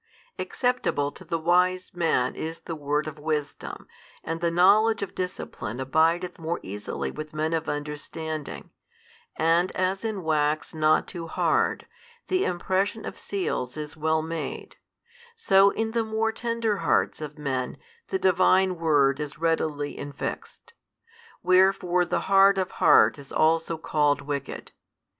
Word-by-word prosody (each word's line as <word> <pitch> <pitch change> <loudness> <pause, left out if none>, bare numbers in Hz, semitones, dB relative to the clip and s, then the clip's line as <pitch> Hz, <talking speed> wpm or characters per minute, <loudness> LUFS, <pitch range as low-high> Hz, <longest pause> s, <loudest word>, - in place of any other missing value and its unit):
Acceptable 245 - 0
to - - -14
the 165 - -2
wise 180 +2 +1
man 165 -8 +1
is 165 +1 -6
the 165 - -6
word 150 0 -1
of 155 -1 -7
wisdom, 150 -1 -4 0.4
and 165 +1 -4
the 170 - +2
knowledge 200 +5 +4
of 195 - -6
discipline 180 - -5
abideth 165 +7 +1
more 165 +1 -2
easily 105 +2 -5
with 155 0 -8
men 155 +1 -1
of 165 0 -1
understanding, 150 +1 -5 0.6
and 165 +3 +2
as 185 +2 -1
in 215 -5 -3
wax 155 0 0
not 155 0 +3
too 170 -3 -7
hard, - - +1 0.4
the 370 +1 +2
impression 190 +4 -1
of - - -6
seals 155 -10 -3
is 150 0 -6
well 160 0 0
made, 165 0 -5 0.6
so 195 - +5
in 220 +2 -2
the 230 0 0
more 220 0 0
tender 230 -2 -1
hearts - - +1
of 150 0 -7
men 130 -4 -3 0.3
the - - -1
Divine 185 0 +3
Word 145 -4 +3
is 150 -1 -5
readily 155 -3 -1
infixed: 140 0 -7 0.7
wherefore 185 -1 +3
the - - -1
hard 195 0 +5
of 185 -1 -1
heart - - +5
is 140 -1 -13
also 165 +1 +2
called 145 -2 +1
wicked. 140 -1 -5
165 Hz, 140 wpm, -26 LUFS, 150-185 Hz, 0.7 s, so